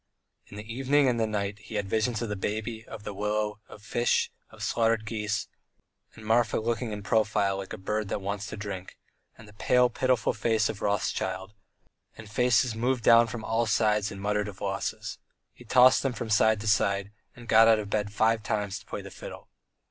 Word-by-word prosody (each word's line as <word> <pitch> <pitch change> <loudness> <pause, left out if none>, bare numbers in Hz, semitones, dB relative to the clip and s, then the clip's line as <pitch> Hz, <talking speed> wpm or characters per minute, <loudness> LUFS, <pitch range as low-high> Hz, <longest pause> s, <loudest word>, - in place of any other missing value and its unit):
In 100 - -11
the 105 - -6
evening 135 +5 +2
and 120 -2 +1
the 110 - +1
night 105 -1 -3
he 110 - -10
had 100 -2 -1
visions 110 +2 0
of 115 - -4
the 105 - -2
baby, 110 +3 -3
of 110 -2 -9
the 105 - -5
willow, 105 +1 -2
of 105 - -13
fish, 120 +1 +1 0.2
of - - -10
slaughtered 115 -1 +1
geese, 105 -2 -2 0.7
and 110 - -12
Marfa 115 0 +2
looking 115 +1 -2
in 105 -1 -6
profile 100 -2 +1
like 95 -1 -7
a - - -5
bird 105 +2 -2
that - - -2
wants 100 +2 -4
to - - -7
drink, 100 -3 -7 0.4
and 105 - -14
the 105 - -15
pale, 125 +3 +3
pitiful 130 -1 +1
face 110 0 +1
of 100 - -6
Rothschild, 95 -1 -2 0.6
and 110 - -10
faces 125 +1 +3
moved 120 +2 -1
down 115 0 +7
from 110 -1 -6
all 115 +1 0
sides 105 -2 +2
and 100 - -8
muttered 105 +1 -1
of 95 -2 -9
losses. 100 -1 -4 0.3
He 125 - -16
tossed 125 +3 +6
from 115 0 -5
side 110 0 +4
to 110 - -5
side, 100 -1 +1 0.2
and 120 -2 -13
got 115 +1 +6
out 115 -1 +6
of 105 -1 -5
bed 105 -1 -1
five 110 +2 +2
times 105 -2 -2
to 95 - -20
play - - -6
the - - -10
fiddle. - - -10
110 Hz, 200 wpm, -28 LUFS, 105-115 Hz, 0.7 s, down